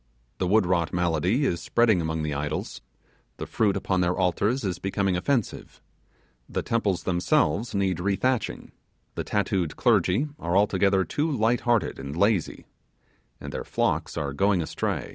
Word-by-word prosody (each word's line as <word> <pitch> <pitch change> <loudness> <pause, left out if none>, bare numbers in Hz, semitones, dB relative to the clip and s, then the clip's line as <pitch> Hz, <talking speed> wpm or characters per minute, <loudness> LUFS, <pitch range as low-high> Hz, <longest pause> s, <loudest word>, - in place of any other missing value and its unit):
The 90 - 0
wood 105 +1 +4
rot 85 -2 0
malady 90 - +1
is 85 -9 -1
spreading 115 -6 +2
among 80 -1 -2
the 75 -1 -2
idols 75 +2 -4 0.6
the - - -5
fruit 105 -3 +1
upon 95 -1 0
their 90 0 0
altars 100 +7 +1
is 95 -3 -2
becoming 95 -1 0
offensive 115 +5 -2 0.7
the - - -2
temples 100 -7 0
themselves 90 +3 +1
need 95 -3 0
rethatching 105 +7 -1 0.4
the - - -3
tattooed 95 -5 -1
clergy 115 +12 +2
are 85 +3 0
altogether 100 -1 +3
too 150 - -1
light 120 -2 +2
hearted 120 - +1
and 70 +3 -6
lazy 100 -2 +1 0.7
and - - -8
their - - -4
flocks - - -1
are 70 -2 -2
going 95 +2 +2
astray. - - -3
95 Hz, 150 wpm, -26 LUFS, 85-110 Hz, 0.7 s, wood